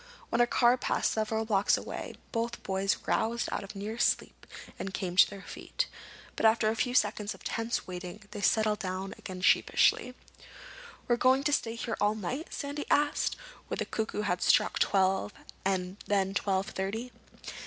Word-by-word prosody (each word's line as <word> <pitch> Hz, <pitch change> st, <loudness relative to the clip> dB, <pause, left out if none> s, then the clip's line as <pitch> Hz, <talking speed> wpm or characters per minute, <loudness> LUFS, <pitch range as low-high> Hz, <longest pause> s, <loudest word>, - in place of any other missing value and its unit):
When 235 Hz, -, +2 dB
a 240 Hz, -, +5 dB
car 240 Hz, +1 st, +4 dB
passed -, -, 0 dB
several 220 Hz, 0 st, -1 dB
blocks 205 Hz, -2 st, +3 dB
away -, -, -6 dB, 0.2 s
both 235 Hz, 0 st, -2 dB
boys 195 Hz, +1 st, 0 dB
roused 230 Hz, +1 st, 0 dB
out -, -, -2 dB
of 200 Hz, +1 st, -9 dB
a -, -, -7 dB
near 215 Hz, +4 st, -5 dB
sleep -, -, 0 dB, 0.3 s
and 190 Hz, 0 st, -4 dB
came 180 Hz, -3 st, -3 dB
to 185 Hz, -, +7 dB
their 200 Hz, 0 st, -9 dB
feet. -, -, -3 dB, 0.5 s
But 225 Hz, -, +4 dB
after 220 Hz, 0 st, +3 dB
a 220 Hz, -, 0 dB
few 245 Hz, +2 st, -1 dB
seconds 210 Hz, -4 st, +1 dB
of -, -, -17 dB
tense 230 Hz, 0 st, -2 dB
waiting 180 Hz, +3 st, -7 dB
they 210 Hz, -1 st, -6 dB
settled 215 Hz, 0 st, +2 dB
down 190 Hz, +1 st, -4 dB
again 185 Hz, -1 st, -7 dB
sheepishly. 250 Hz, +6 st, +3 dB, 0.9 s
"We 240 Hz, -, +3 dB
going 260 Hz, +2 st, +4 dB
to 295 Hz, 0 st, +1 dB
stay 230 Hz, -4 st, 0 dB
here 230 Hz, -1 st, -3 dB
all 210 Hz, +1 st, +3 dB
night?" 250 Hz, -, -4 dB
Sandy 290 Hz, 0 st, -4 dB
asked, 295 Hz, 0 st, +2 dB, 0.3 s
when -, -, -3 dB
the -, -, -1 dB
cuckoo 220 Hz, -1 st, -2 dB
had 180 Hz, -3 st, -1 dB
struck -, -, +3 dB
twelve 190 Hz, -, +2 dB, 0.3 s
and 185 Hz, 0 st, -1 dB
then 195 Hz, -1 st, +1 dB
twelve 195 Hz, 0 st, 0 dB
thirty. 220 Hz, +6 st, -3 dB
215 Hz, 175 wpm, -30 LUFS, 195-235 Hz, 0.9 s, to